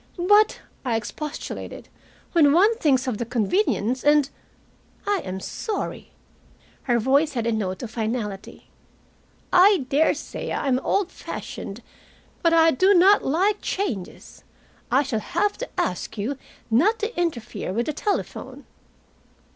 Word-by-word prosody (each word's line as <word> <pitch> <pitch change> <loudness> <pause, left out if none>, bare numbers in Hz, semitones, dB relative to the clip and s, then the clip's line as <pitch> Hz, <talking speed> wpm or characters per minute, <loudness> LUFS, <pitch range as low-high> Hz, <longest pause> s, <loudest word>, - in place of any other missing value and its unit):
"But," 415 +4 +4 0.2
I 245 -3 0
expostulated, 280 +7 -6 0.4
"when 295 -5 +5
one 410 +7 +5
thinks 265 - +2
of 250 -5 -2
the - - 0
convenience, 245 - 0
and 295 -1 +4 0.4
" - - -34
"I 405 -2 +1
am 190 0 -5
sorry." 425 - -5 0.8
Her 240 - +4
voice 275 +6 +2
had 235 -3 -2
a 230 - +1
note 200 -2 -2
of 225 - -6
finality. 220 -3 -4 0.8
"I 370 -5 +6
daresay 295 +3 0
I - - -2
am 255 -1 +2
old 380 +6 0
fashioned, - - -7 0.6
but 335 - +3
I 330 0 +5
do 380 +8 +4
not 385 +4 +6
like 385 +9 +1
changes. 240 - -4 0.5
I 265 +4 +3
shall 250 -5 -2
have 410 - -1
to - - -5
ask 185 +5 -2
you 225 +8 -2 0.4
not 365 - +4
to 445 +3 -4
interfere 240 - -3
with 235 +5 -1
the 305 - -2
telephone." 410 +7 -4
280 Hz, 140 wpm, -24 LUFS, 230-370 Hz, 0.8 s, I